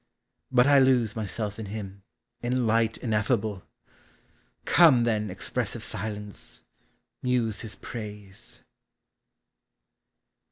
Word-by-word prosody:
But 125 -1 +5
I 140 0 +6
lose 125 -4 +3
Myself 105 0 -3
in 110 - -5
him, 100 -1 -7 0.4
in 125 0 0
Light 115 0 +2
ineffable! 110 -3 0 1.0
Come, 150 -9 +6
then, 110 -3 0
expressive 90 - -3
Silence, 105 0 -6 0.6
muse 120 -4 0
his 110 -2 -5
praise. 105 -4 -8
110 Hz, 90 wpm, -27 LUFS, 105-125 Hz, 1.0 s, I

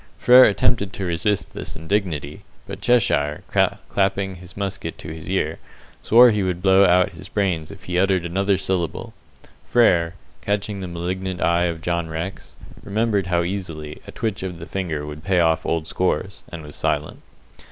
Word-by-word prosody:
Frere 125 +1 +8
attempted 100 -1 +1
to 95 - -4
resist 90 +1 -1
this - - -6
indignity, 80 -2 -2 0.2
but - - -8
Cheshire, 75 -12 +2 0.4
clapping 95 0 0
his 90 +1 -13
musket 100 -1 -4
to 80 - -8
his 80 -1 -9
ear, - - -1 0.4
swore 120 +2 +7
he 105 -1 0
would 90 -2 -1
blow 95 0 +6
out 90 0 +4
his 80 -3 -12
brains 90 -6 -1
if - - -12
he 90 0 -1
uttered 95 -2 +2
another 95 +3 +1
syllable; 90 -4 -2 0.5
Frere, 90 -8 +3 0.3
catching 105 0 -2
the 95 - -4
malignant 90 +2 -4
eye 85 +1 +2
of 85 -2 -3
John 85 -1 -1
Rex, 85 +4 -6 0.3
remembered 105 -2 0
how 85 -1 +1
easily 85 -5 -5
a - - -7
twitch 110 -3 -3
of 90 -2 -5
the 85 - -8
finger 85 -7 -3
would 75 +1 -8
pay 95 -2 +2
off 80 -1 +2
old 80 -1 0
scores, 95 +2 -2
and 85 -2 -7
was 75 -1 -10
silent. - - -2
90 Hz, 170 wpm, -22 LUFS, 85-100 Hz, 0.5 s, Frere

